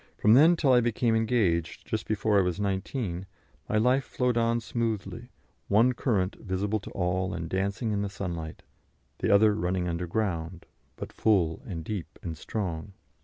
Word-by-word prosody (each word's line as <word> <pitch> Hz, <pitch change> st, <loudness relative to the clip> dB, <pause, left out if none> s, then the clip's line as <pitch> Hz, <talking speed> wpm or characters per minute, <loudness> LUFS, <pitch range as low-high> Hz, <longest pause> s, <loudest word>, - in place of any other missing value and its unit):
From 105 Hz, -, +5 dB
then 160 Hz, +7 st, +7 dB
till 140 Hz, -6 st, +3 dB
I 125 Hz, -, +6 dB
became 120 Hz, 0 st, +1 dB
engaged, 110 Hz, -8 st, 0 dB
just -, -, -3 dB
before 105 Hz, -1 st, +2 dB
I -, -, +5 dB
was 90 Hz, +1 st, -1 dB
19, 95 Hz, -1 st, -2 dB, 0.4 s
my -, -, +1 dB
life 125 Hz, +5 st, +3 dB
flowed 125 Hz, -2 st, -1 dB
on 115 Hz, 0 st, +2 dB
smoothly, 115 Hz, 0 st, -3 dB, 0.4 s
one 115 Hz, +5 st, +4 dB
current 105 Hz, -7 st, 0 dB
visible 100 Hz, +2 st, -2 dB
to 105 Hz, -, -10 dB
all 90 Hz, 0 st, -1 dB
and 85 Hz, -1 st, -4 dB
dancing 100 Hz, +5 st, -1 dB
in 100 Hz, -1 st, 0 dB
the 100 Hz, -, -2 dB
sunlight, 85 Hz, -5 st, -6 dB, 0.6 s
the -, -, 0 dB
other 105 Hz, +1 st, +6 dB
running 90 Hz, -3 st, -1 dB
underground, 85 Hz, -1 st, -2 dB, 0.3 s
but -, -, -8 dB
full 90 Hz, -7 st, +2 dB
and 85 Hz, -5 st, -5 dB
deep 85 Hz, -4 st, -6 dB
and 85 Hz, -2 st, -4 dB
strong. 90 Hz, +1 st, -4 dB
100 Hz, 165 wpm, -28 LUFS, 90-115 Hz, 0.6 s, then